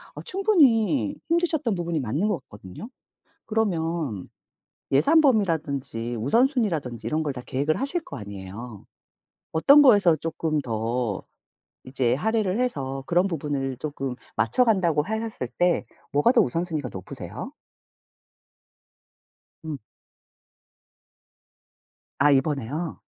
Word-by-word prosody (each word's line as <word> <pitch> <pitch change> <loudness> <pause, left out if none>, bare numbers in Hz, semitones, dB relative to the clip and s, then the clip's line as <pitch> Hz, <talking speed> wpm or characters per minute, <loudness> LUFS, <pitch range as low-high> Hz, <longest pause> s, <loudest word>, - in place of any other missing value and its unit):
어 - - -7
충분히 290 - +3
힘드셨던 325 - +1
부분이 170 -3 -2
맞는 140 - -1
것 180 - 0
같거든요. 105 - -11 0.6
그러면 165 - -1 0.6
예산 160 - +5
범위라든지 145 - 0
우선순위라든지 165 - 0
이런 155 +1 0
걸 145 - -1
다 125 - -7
계획을 145 +4 0
하실 300 +5 -1
거 - - -8
아니에요. 100 +2 -9 0.7
어떤 280 - +7
거에서 205 - +6
쪼끔 160 -1 -2
더 115 -2 -2 0.6
이제 130 -2 0
할애를 215 - 0
해서 135 - -2
그런 175 +2 +3
부분을 140 -5 -3
쪼끔 135 -3 -4 0.2
맞춰 115 - +3
간다고 175 -9 +2
하셨을 220 - -4
때 175 -1 +2 0.3
뭐가 145 - +4
더 245 - +5
우선순위가 165 -6 -2
높으세요? 95 -2 -7 2.1
음. 155 -2 -4 2.4
아 145 +2 +5
이번에요? 140 +3 -1
160 Hz, 255 characters per minute, -25 LUFS, 130-220 Hz, 2.4 s, 어떤